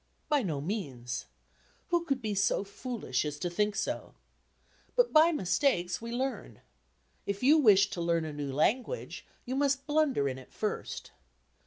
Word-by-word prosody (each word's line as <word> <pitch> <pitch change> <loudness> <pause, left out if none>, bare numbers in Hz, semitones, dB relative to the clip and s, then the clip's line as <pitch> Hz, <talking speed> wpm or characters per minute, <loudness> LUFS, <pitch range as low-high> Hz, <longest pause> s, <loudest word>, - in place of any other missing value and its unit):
By 295 -2 +3
no 160 - -2
means. 140 - -4 0.6
Who 345 -1 +1
could 275 -5 -1
be 215 -1 -1
so 200 0 +2
foolish 200 - -3
as 150 -1 -4
to 175 +3 -3
think 210 +3 0
so? - - -3 0.8
But - - +3
by 320 +2 +7
mistakes 185 - +1
we 230 0 -6
learn. 260 +3 -3 0.7
If 200 +3 -3
you 300 +5 +6
wish 205 -6 +6
to 175 - -4
learn 170 -1 +1
a 155 - -5
new 145 -2 -4
language 240 - -1 0.2
you 255 - -3
must 275 0 +1
blunder 295 - +2
in 130 -1 -3
it 130 - -15
first. - - -4
210 Hz, 160 wpm, -30 LUFS, 165-275 Hz, 0.8 s, by